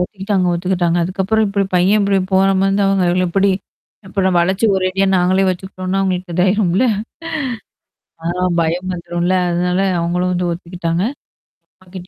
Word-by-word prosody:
ஒத்துக்கிட்டாங்க 195 0 -1
ஒத்துக்கிட்டாங்க. 175 -1 0
அதுக்கப்புறம் 195 +5 0
இப்டி 200 0 0
பையன் 190 +4 +3
இப்டி 200 -1 +2
போற 190 +1 +4
மாரி 195 - +2
இருந்தா 195 0 +1
அவுங்க 195 -1 +2 0.2
எப்டி? 195 +3 +2 0.6
அப்பறம் 190 -1 0
வளச்சு 190 +5 +1
ஒரேடியா 190 +1 0
நாங்களே 185 +2 +2
வச்சுக்கிட்டோம்ன்னா, 185 +1 -3
அவுங்களக்கு 185 -2 -2
இதாயிரும்ல. 185 +3 +2 1.4
ஆ, - - -16 0.4
பயம் 170 +3 -1
வந்துரும்ல! 175 +1 -2 0.2
அதனால 180 +1 0 0.2
அவுங்களும் 180 +2 0
வந்து 180 0 -1
ஒத்துக்கிட்டாங்க. 170 0 -3 0.8
அப்பா - - -25
கிட்ட 185 -1 -8
185 Hz, 135 wpm, -17 LUFS, 175-195 Hz, 1.4 s, போற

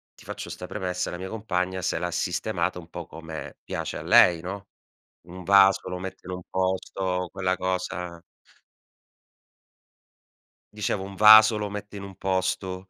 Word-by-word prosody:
ti - - -17
faccio - - -7
'sta - - -7
premessa, 90 -1 -3
la 90 - -5
mia 95 +1 -6
compagna 95 -4 -2
se 90 - 0
l'ha 90 0 -2
sistemato 90 0 -1
un 85 -1 -13
po' 85 -1 -7
come 80 -1 -9
piace - - -4
a - - -6
lei, 85 -2 +5
no, 95 +3 -7 0.6
un 90 +1 -9
vaso 95 +1 +5
lo 90 0 -4
mette 95 0 -8
in - - -5
un 90 - -6
posto, 95 -1 -2
quella 95 -1 -1
cosa 90 -2 -3 2.6
Dicevo 105 -2 -2
un 100 0 -8
vaso 110 +2 +8
lo 105 -1 -3
mette 105 0 -7
in - - -7
un 100 -1 -9
posto, 95 0 -2
95 Hz, 160 wpm, -26 LUFS, 90-100 Hz, 2.6 s, vaso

